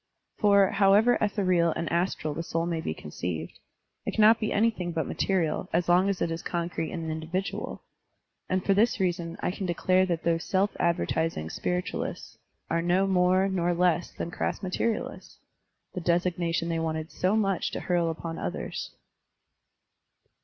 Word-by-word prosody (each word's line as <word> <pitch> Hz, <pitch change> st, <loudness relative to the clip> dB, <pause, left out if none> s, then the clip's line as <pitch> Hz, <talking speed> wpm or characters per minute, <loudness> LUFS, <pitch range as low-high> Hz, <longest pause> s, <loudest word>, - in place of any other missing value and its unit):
For, 200 Hz, -2 st, +5 dB
however 205 Hz, +4 st, +5 dB
ethereal 185 Hz, -6 st, +2 dB
and 170 Hz, -, -2 dB
astral 170 Hz, -3 st, 0 dB
the 165 Hz, -, -3 dB
soul 165 Hz, 0 st, -2 dB
may 170 Hz, -2 st, -2 dB
be -, -, -3 dB
conceived, 80 Hz, +1 st, -5 dB, 0.4 s
it -, -, -3 dB
cannot 220 Hz, +1 st, +6 dB
be 215 Hz, -, -1 dB
anything 210 Hz, -5 st, +1 dB
but 160 Hz, -1 st, -1 dB
material, 180 Hz, -5 st, -1 dB
as 170 Hz, +1 st, +1 dB
long 180 Hz, +3 st, +4 dB
as 195 Hz, -, 0 dB
it 165 Hz, -, -1 dB
is 165 Hz, +1 st, -3 dB
concrete 170 Hz, -2 st, -3 dB
and 165 Hz, -3 st, -4 dB
individual. 165 Hz, +5 st, -4 dB, 0.7 s
And 185 Hz, 0 st, 0 dB
for 200 Hz, -, +4 dB
this 220 Hz, +4 st, +2 dB
reason 175 Hz, -2 st, -1 dB
I -, -, 0 dB
can 190 Hz, 0 st, -4 dB
declare 185 Hz, +2 st, +2 dB
that 170 Hz, -2 st, -2 dB
those 165 Hz, -1 st, +1 dB
self 195 Hz, +2 st, +1 dB
advertising 165 Hz, -, 0 dB
spiritualists 180 Hz, -, -3 dB, 0.3 s
are 165 Hz, -, 0 dB
no 180 Hz, +3 st, +2 dB
more 185 Hz, 0 st, +3 dB
nor 175 Hz, -2 st, 0 dB
less 175 Hz, -1 st, +1 dB
than 170 Hz, -, -5 dB
crass -, -, -3 dB
materialists, 215 Hz, +4 st, -3 dB, 0.3 s
— -, -, -51 dB
the 180 Hz, -, -4 dB
designation 170 Hz, -1 st, 0 dB
they 165 Hz, -1 st, 0 dB
wanted 160 Hz, 0 st, -3 dB
so 185 Hz, +3 st, +1 dB
much 195 Hz, -4 st, +1 dB
to -, -, -5 dB
hurl 175 Hz, -2 st, +1 dB
upon 165 Hz, 0 st, -5 dB
others. -, -, -5 dB
175 Hz, 160 wpm, -27 LUFS, 165-190 Hz, 0.7 s, cannot